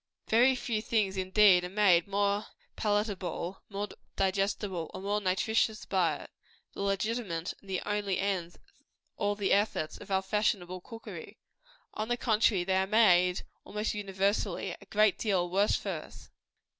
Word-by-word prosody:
Very 245 +4 +5
few 230 -3 -2
things, 210 -4 0
indeed, 190 -1 +5
are 180 - -4
made 185 -3 +4
more 200 +1 0 0.3
palatable, 200 -4 -2
more 205 0 -4 0.3
digestible, 195 -2 -1
or - - -5
more 205 +2 -1
nutritious 215 +3 +1
by 185 -4 +1
it - - -15 0.4
the - - -6
legitimate 195 -3 -1
and 190 -2 -3
only 205 -2 -1
ends 185 -4 -2
of - - -24 0.6
all 205 -1 0
the 205 -2 -1
efforts 200 -6 0
of - - -12
our 190 0 +1
fashionable 190 -3 -1
cookery. 225 +4 -10 0.6
On 215 - -3
the 240 +1 0
contrary, 220 -5 +2
they 190 +1 +1
are 190 0 +1
made, 180 -4 +4 0.2
almost 210 +1 -3
universally, 200 0 -1
a - - -15
great 215 -2 +3
deal 190 -5 +1
worse 200 +3 +3
for - - -3
us. - - -9
200 Hz, 150 wpm, -30 LUFS, 185-210 Hz, 0.6 s, Very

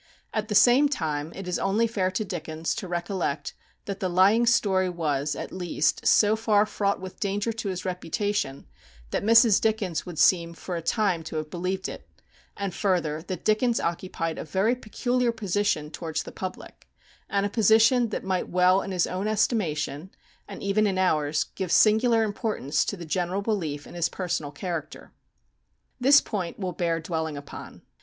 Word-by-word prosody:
At 215 -1 -1
the 210 - -2
same 255 +7 +6
time, 155 - -2
it 195 -1 -7
is 180 - -1
only 205 +4 +2
fair 200 -5 0
to 185 +3 -2
Dickens 160 -3 -3
to 190 - -5
recollect 175 -4 -3 0.3
that 200 -1 -5
the 185 - -1
lying 200 +7 +4
story 190 -5 +3
was, 150 -4 -1
at - - -6
least, 175 -4 -1
so 210 0 +5
far 215 -2 +3
fraught 200 -1 -1
with 190 0 -9
danger 205 +3 -1
to 220 -2 -4
his 185 -1 -4
reputation, 180 -4 -2 0.5
that - - 0
Mrs. 230 -1 +6
Dickens 210 -7 0
would 175 -3 -9
seem 170 -1 +3
for 180 +1 -6
a 170 - -3
time 185 0 +1
to 160 - -7
have 155 -1 -4
believed 185 +2 -2
it; - - -9 0.5
and 200 -3 -3
further, 170 -7 0
that 185 -3 -5
Dickens 230 +2 +2
occupied 170 -1 -3
a - - -4
very 190 +9 +1
peculiar 245 +1 -1
position 205 -7 -1
towards 165 -2 -4
the - - -9
public, 185 -1 -8 0.4
and 200 0 +1
a - - -1
position 225 +3 +4
that - - -4
might 190 -1 -1
well 185 +1 +4
in - - -6
his 180 -3 +1
own 190 +3 -3
estimation, 185 - -1 0.4
and 200 - -9
even 205 +2 +2
in 190 -2 -1
ours, 155 -5 +1
give 190 -3 -4
singular 225 +3 +4
importance 205 - -1
to 200 - -3
the 170 - -8
general 180 +4 -1
belief 160 -10 -2
in - - -12
his 170 -2 0
personal 170 -6 -3
character. 165 +1 -6 0.9
This 280 +3 +6
point 185 -5 -4
will 185 -3 -3
bear 170 -2 0
dwelling 160 -2 -3
upon. 140 0 -10
185 Hz, 175 wpm, -26 LUFS, 165-215 Hz, 0.9 s, same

